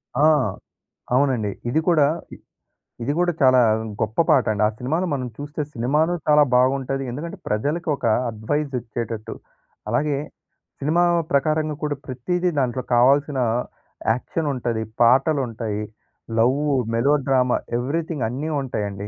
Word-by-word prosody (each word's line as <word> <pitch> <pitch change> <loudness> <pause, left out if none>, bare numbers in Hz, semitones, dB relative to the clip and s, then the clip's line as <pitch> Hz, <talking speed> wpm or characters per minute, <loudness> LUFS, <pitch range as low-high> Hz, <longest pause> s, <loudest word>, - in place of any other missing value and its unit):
ఆ! 145 +4 +4 0.9
అవునండి. 125 -6 +1 0.2
ఇది 150 - +2
కూడా, 155 -5 +5 0.3
ఇద్ - - -19 0.6
ఇది 140 +5 0
కూడా, 175 0 +3
చాలా 130 -1 +6 0.4
గొప్ప 110 +4 -1
పాటండి. 110 -8 +3
ఆ - - +1
సినిమాలో 160 +9 -1
మనం 130 -3 -2
చూస్తే, 145 +1 -5
సినిమాను 150 +8 +1
చాలా 150 -1 +6
బాగుంటది. 135 +1 +1
ఎందుకంటే 155 +7 -6
ప్రజలకొక 145 +6 -1 0.3
అడ్వైజిచ్చేటట్టు. 115 -2 -3 0.5
అలాగే, 140 +5 +1 0.6
సినిమా 155 +5 +2 0.3
ప్రకారంగా 155 +2 +1
కూడా 150 -1 0
,ప్రతీది 175 +8 -1
దాంట్లో 130 -1 -1
కావాల్సిన 140 +3 +3 0.7
యాక్షనుంటది. 125 -3 -2 0.2
పాటలుంటాయి. 120 -4 +2 0.6
లవ్వు, 140 +5 +2 0.2
మెలో 135 +5 +3
డ్రామా 125 -2 +3 0.2
ఎవ్రీథింగన్నీ 140 0 -2
ఉంటాయండి. 105 -5 -4
135 Hz, 105 wpm, -22 LUFS, 120-150 Hz, 0.9 s, చాలా